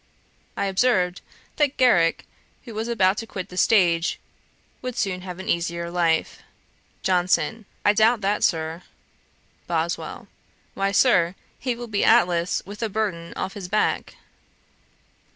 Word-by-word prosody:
I 200 - 0
observed 190 -3 +1 0.4
that 295 -3 +1
Garrick, 180 -11 +3 0.4
who 235 - -9
was 220 +2 -3
about 200 -4 +2
to 225 - -6
quit 185 -4 -6
the 180 - -10
stage, 175 -4 +3 0.6
would 255 -1 -5
soon 185 -5 -1
have 180 -1 -7
an 190 - -8
easier 170 0 -1
life. 170 -2 0 0.6
JOHNSON. 185 +4 +1 0.2
'I 205 - +6
doubt 220 +2 +3
that, 200 +1 0
Sir.' 160 0 0 0.9
BOSWELL. - - -3 0.5
'Why, 195 0 0
Sir, 185 -5 +3 0.2
he 250 -1 -2
will 240 +1 -7
be 210 -3 -1
Atlas 180 -6 +3
with 205 +2 -9
the 225 - -1
burthen 190 -6 -2
off 195 - -3
his 200 -4 -7
back.' 210 +3 0
195 Hz, 135 wpm, -24 LUFS, 175-225 Hz, 0.9 s, I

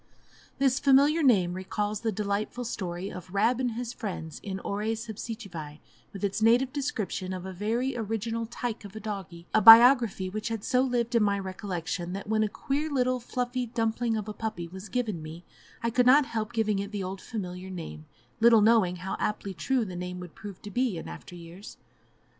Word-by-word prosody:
This 265 -1 +2
familiar 285 +4 +5
name 195 - +4
recalls 205 +3 -3
the 225 - 0
delightful 210 +4 -2
story 185 -3 -4
of 180 0 -9
"Rab 225 +5 +2
and 250 -3 0
his 240 +1 -4
Friends" 180 -8 -6
in 195 -2 -4
"Horæ 210 +3 -2
Subsicivæ," 215 -8 -7 0.3
with 195 - -9
its 200 +2 -1
naïve 245 +4 +4
description 210 - -3
of 185 0 -6
a 190 - -6
very 230 +7 -1
original 225 0 -2
"tyke" 235 -1 -4
of 200 0 -11
a - - -5
doggie 195 -5 -6
a 215 - +5
biography 230 -4 +8
which 210 +4 -4
had 225 -3 -3
so 255 -1 +2
lived 245 -2 0
in 235 - +4
my 200 -1 +2
recollection 180 -2 -4
that 195 0 -6
when 215 0 +1
a 215 - +1
queer 285 +8 -2
little 255 -3 +1
fluffy 245 0 -2
dumpling 225 0 0
of 210 -1 -4
a 215 - -4
puppy 205 -5 -4
was 190 +4 -9
given 215 -7 -2
me 160 +3 -9 0.4
I 230 - +1
could 250 +1 +3
not 275 +3 +7
help 220 -2 -3
giving 215 -3 +1
it 200 +1 -4
the 205 -2 -3
old 190 +1 -5
familiar 185 -4 -6
name, 80 - -7 0.3
little 230 -1 +7
knowing 210 -5 +4
how 185 +2 -4
aptly 205 -2 -2
true 255 +5 0
the 185 -3 -7
name 180 0 -5
would 180 -2 -9
prove 205 -4 -10
to 205 - -7
be 245 -4 0
in - - -7
after 80 - -9
years. 175 +3 -11
215 Hz, 195 wpm, -28 LUFS, 185-235 Hz, 0.4 s, biography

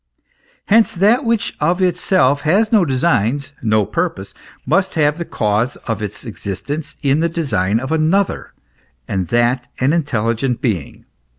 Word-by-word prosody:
Hence 220 +2 +4
that 210 +8 +3
which 230 -2 0
of 170 +5 +1
itself 180 -6 +2
has 200 +8 +2
no 215 -5 +5
designs, 140 -2 0
no 110 -2 +2
purpose, 165 - -3 0.3
must 190 +3 +1
have 150 -1 +2
tbe 170 - -5
cause 110 +3 0
of 115 -1 -3
its 105 +4 -6
existence 120 - -5
in 140 +1 +2
the 170 +1 +1
design 115 - 0
of 130 +4 -5
another, 160 +5 0 0.6
and 95 -3 -2
that 120 +1 +1
an 130 +4 +2
intelligent 120 -5 -1
being. 100 - -3
145 Hz, 140 wpm, -18 LUFS, 115-170 Hz, 0.6 s, no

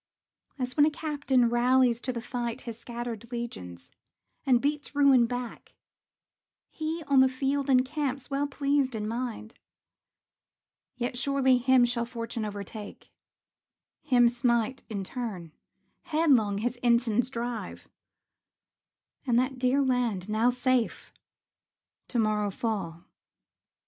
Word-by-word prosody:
As 250 -2 -3
when 295 0 +5
a - - +3
captain 290 -5 +1
rallies 245 0 +3
to 255 - -2
the 235 -2 -5
fight 245 0 -4
His 230 -2 -8
scattered 235 -1 -6
legions, 160 - -7 0.6
and 250 -2 +5
beats 290 +2 -2
ruin 275 -4 +5
back, 245 -1 -6 1.0
He, 320 +1 -4
on 280 -2 +3
the 260 0 +6
field, 275 +2 -1
encamps, 270 +1 +1
well 280 +1 -1
pleased 280 -2 0
in 210 -1 -3
mind. 230 -1 -4 1.4
Yet 245 0 -3
surely 265 -1 +3
him 255 0 +5
shall 235 -1 -1
fortune 230 -2 -4
overtake, 205 0 -8 0.9
Him 245 -2 +4
smite 240 +1 0
in 200 -3 -3
turn, 190 -7 -6 0.5
headlong 275 -11 +3
his 245 +4 -2
ensigns 235 0 +2
drive; 235 -2 -5 1.4
And 240 -2 +3
that 255 +1 0
dear 260 +2 +2
land, 240 -8 0
now 220 +3 +2
safe, 250 -1 0 0.9
to 245 - -3
morrow 215 -2 +1
fall. 190 -6 -4
245 Hz, 120 wpm, -28 LUFS, 230-265 Hz, 1.4 s, the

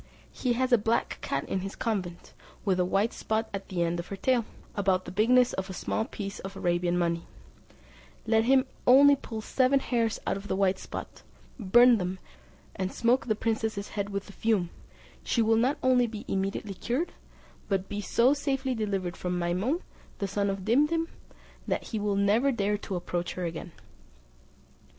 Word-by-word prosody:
He 250 -2 0
has 255 +2 0
a 240 - +6
black 225 +3 0
cat 140 - -2
in 195 - -1
his 195 +1 -6
convent, 185 -6 -3 0.3
with 190 -3 +2
a - - +4
white 195 +5 +1
spot 220 +1 -1
at 200 0 -5
the 180 -3 0
end 170 +1 -1
of 170 - -5
her 200 - -5
tail, 240 +3 +1 0.3
about 190 -2 +1
the - - -7
bigness 245 +5 +4
of 190 +1 -3
a - - -5
small 220 +4 -2
piece 200 -5 -6
of 195 +1 -7
Arabian 175 0 +1
money; 170 -1 -1 1.0
let 220 0 +3
him 265 +1 +4 0.2
only 280 +3 +8
pull 225 -5 -7
seven 260 +4 +2
hairs 235 -4 0
out - - 0
of 200 +1 -9
the - - -1
white 190 -1 +2
spot, - - -8 0.4
burn 240 +3 +6
them, 180 +1 -2 0.6
and 190 0 -2
smoke 240 +1 +1
the 215 - +2
princess's 220 -2 -2
head 200 -1 -3
with 200 0 -3
the 200 - -12
fume, 205 -6 0 0.5
she 230 - +1
will 225 +1 +3
not 255 +6 +2
only 250 -2 +4
be 215 -2 -7
immediately 195 +1 -2
cured, 250 - -2 0.6
but 195 -1 0
be 205 - -4
so 240 +6 +3
safely 270 -2 -1
delivered 195 -6 -2
from 180 0 -2
Maimoun, 185 - 0 0.4
the 200 - -2
son 200 +1 0
of 195 -1 -4
Dimdim, 300 +8 +2 0.6
that - - -1
he 220 - -2
will 205 -1 0
never 210 +7 +3
dare 210 -3 0
to 195 - -5
approach 175 0 -3
her 180 - -3
again." 165 +1 -5
210 Hz, 185 wpm, -28 LUFS, 190-240 Hz, 1.0 s, only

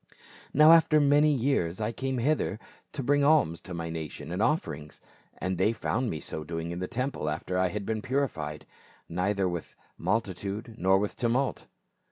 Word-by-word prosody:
" - - -18
Now 155 +3 +8
after 160 -2 +6
many 145 +1 +5
years 120 - 0
I 110 +1 -1
came 130 +2 -3
hither 130 -4 0 0.4
to 140 - -4
bring 145 +2 +3
alms 140 - +3
to 95 - -8
my 85 -1 -4
nation 80 -1 -6
and 90 +4 -2
offerings; 80 - -1 0.4
and 95 -1 -2
they 110 - +3
found 120 +2 -1
me 80 - -3
so 80 - -4
doing 80 +1 -4
in 85 - -4
the 90 - -3
temple 125 - -2
after 85 +4 -3
I 95 - +3
had 100 +2 -4
been 110 0 -2
purified, 95 - -2 0.4
neither 95 +3 0
with 85 -2 -5 0.2
multitude 105 +1 -2
nor 95 0 +3
with 105 +1 -2
tumult. 125 +3 0
105 Hz, 180 wpm, -28 LUFS, 85-135 Hz, 0.4 s, Now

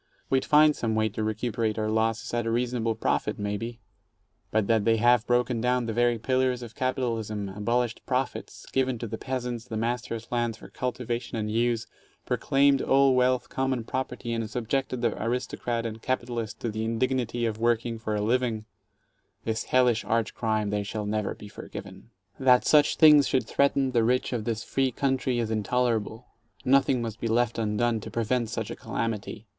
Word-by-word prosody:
We'd 130 -1 +2
find 150 0 +5
some 110 -2 -1
way 110 0 +2
to 110 +1 -4
recuperate 110 0 -1
our 110 0 -1
losses, 110 0 0
at 120 -1 0
a - - +1
reasonable 120 -1 0
profit, 105 -1 -1
maybe. 110 +3 -4 0.7
But 110 -1 +1
that 110 -1 +2
they 115 0 +3
have 120 0 +4
broken 120 -1 +1
down 125 0 +1
the 115 - -2
very 120 +1 +2
pillars 130 +1 0
of 115 -2 -9
capitalism, 115 -6 -2
abolished 115 +4 -1
profits, 130 +1 -3
given 130 -2 +1
to 115 - -5
the 110 0 -5
peasants 125 -3 -3
the 110 -3 -5
masters' 115 0 -2
lands 120 -2 0
for - - -13
cultivation 120 -2 -3
and 105 -1 -2
use, 115 0 +1 0.4
pro - - 0
claimed 140 0 +3
all 135 0 +4
wealth 125 0 +2
common 130 -3 -1
property, 125 0 -3
and 115 -2 -2
subjected 125 +2 -2
the 115 - +1
aristocrat 120 0 -2
and 110 -1 -5
capitalist 120 -3 -3
to 120 - -1
the 110 +1 -3
indignity 120 +1 0
of 110 -1 -2
working 115 0 0
for 110 -2 -2
a 105 - -1
living 115 -1 0 0.4
— - - -46
this 110 0 -1
hellish 125 -3 +3
arch 115 -1 0
crime 110 -2 -1
they 105 0 0
shall 105 +1 -4
never 105 -1 -1
be 105 - -11
forgiven. 105 - -10 0.3
That 125 -2 +5
such 150 -1 +5
things 150 -3 +7
should 130 -4 +1
threaten 140 +1 +2
the 120 -2 +3
rich 125 +3 +1
men 120 - -1
of 105 - -7
this 115 -2 -2
free 135 -1 0
coun 135 +2 +1
try 130 0 -1
is 115 -2 -1
intolerable. 115 +1 0 0.4
Nothing 135 -2 +3
must 115 -2 -5
be 115 - -2
left 115 0 +1
undone 115 +1 +1
to 110 - -8
prevent 115 0 -1
such 115 -1 -4
a - - -4
calamity. 110 -1 -4
115 Hz, 185 wpm, -27 LUFS, 110-125 Hz, 0.7 s, things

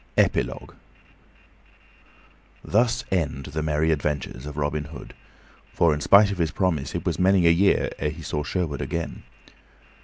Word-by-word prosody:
Epilogue 65 +2 0 1.9
THUS 120 +3 +1
END 75 -7 -1
the 80 - -1
Merry 75 +1 +1
Adventures 75 -3 -3
of 75 0 -8
Robin 75 +1 -1
Hood; 75 - -10 0.6
for, 85 -2 +4
in 75 - -3
spite 100 +4 +6
of 100 - -5
his 80 -2 +1
promise, 80 -7 -1
it - - -4
was - - -1
many 95 -1 +4
a 85 - +7
year 95 +4 +2
ere 75 - 0
he 80 +2 -9
saw 75 0 -3
Sherwood 80 -3 -2
again. 85 0 -4
80 Hz, 150 wpm, -24 LUFS, 75-90 Hz, 1.9 s, a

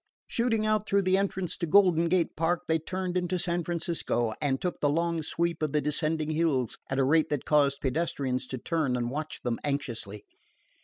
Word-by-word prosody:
Shooting 225 -2 0
out 215 -1 +1
through 200 0 +3
the 185 0 +3
entrance 190 -2 -1
to 170 - -2
Golden 170 -2 +5
Gate 180 -1 +1
Park, 165 +2 +1
they 160 0 +2
turned 185 +2 -4
into 180 0 0
San 175 0 -1
Francisco, 165 -9 -1
and 135 -3 +1
took 180 - -3
the 145 - +3
long 165 +2 0
sweep 170 +2 -1
of 155 -2 -1
the 150 - +3
descending 155 +2 -1
hills 155 -7 0
at 135 - -1
a 135 - +3
rate 155 +4 +3
that 145 -3 -2
caused 140 -2 +3
pedestrians 130 -3 -1
to 130 - -4
turn 145 -1 0
and 120 -1 -2
watch 155 +2 -5
them 120 -2 -1
anxiously. 120 -8 -3
160 Hz, 195 wpm, -28 LUFS, 140-175 Hz, -, Golden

